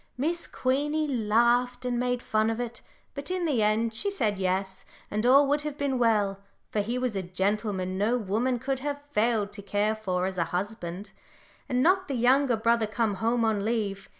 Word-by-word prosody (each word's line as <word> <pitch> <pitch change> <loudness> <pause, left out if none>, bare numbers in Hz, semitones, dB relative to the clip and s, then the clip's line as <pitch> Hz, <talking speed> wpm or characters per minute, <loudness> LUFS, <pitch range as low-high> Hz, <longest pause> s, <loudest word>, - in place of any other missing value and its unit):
Miss 335 +6 -1
Queenie 295 +4 0
laughed 245 +1 +2
and 245 -1 0
made 245 0 -1
fun 215 0 +1
of 225 +1 -2
it, 240 -1 -5 0.3
but 280 +2 -6
in 365 -1 -1
the 275 -8 +1
end 220 +2 +1
she 390 - 0
said 220 - -1
'yes,' 190 0 -1 0.3
and 215 +3 0
all 275 +3 +7
would 290 +1 +2
have 295 -1 -4
been 275 -3 -1
well 210 -4 +2 0.3
for 215 - 0
he 235 +5 -2
was 250 -4 -1
a 195 - -1
gentleman 190 0 -1
no 225 +5 +2
woman 235 +4 0
could 265 +2 -2
have 285 +1 -4
failed 215 -3 +1
to 200 - -7
care 205 +2 0
for 185 -4 -1
as 190 -1 -3
a 170 - +2
husband 190 0 -4 0.6
had 250 - -1
not 370 +8 +3
the 275 - -2
younger 250 +1 +3
brother 230 0 +2
come 215 0 0
home 230 +2 +1
on 215 -3 +1
leave. 205 -3 -2
230 Hz, 195 wpm, -27 LUFS, 205-255 Hz, 0.6 s, all